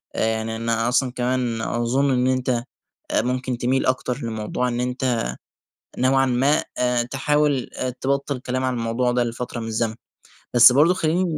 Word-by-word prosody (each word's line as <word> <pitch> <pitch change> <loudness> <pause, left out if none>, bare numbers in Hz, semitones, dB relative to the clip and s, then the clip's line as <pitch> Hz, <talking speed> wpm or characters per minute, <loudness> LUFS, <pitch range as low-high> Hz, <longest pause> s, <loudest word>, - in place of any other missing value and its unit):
آآ - - +1
يعني 110 0 -2
أنا 115 +1 0
أصلًا 125 +1 +1
كمان 125 -2 -1
أظن 120 +5 0
إن 125 0 +2
أنت 130 0 0 0.6
آآ - - +2
ممكن 125 0 -2
تميل 130 +2 0
أكتر 130 -1 0
لموضوع 115 +2 -2
إن 120 0 -2
أنت 125 -1 -1 0.8
نوعًا 135 +1 +3
ما 135 +4 +2
آآ 125 -1 +1
تحاول 140 +1 0
آآ 130 - -2
تبطل 140 +2 -2
كلام 130 +1 -3
عن 130 0 0
الموضوع 120 +1 0
ده 120 0 +1
لفترة 120 0 -4
من 115 - -5
الزمن. 110 0 -1 0.6
بس 120 +1 +9
برضو 150 +7 +5
خلّيني 175 +1 +1
125 Hz, 165 wpm, -22 LUFS, 120-130 Hz, 0.8 s, بس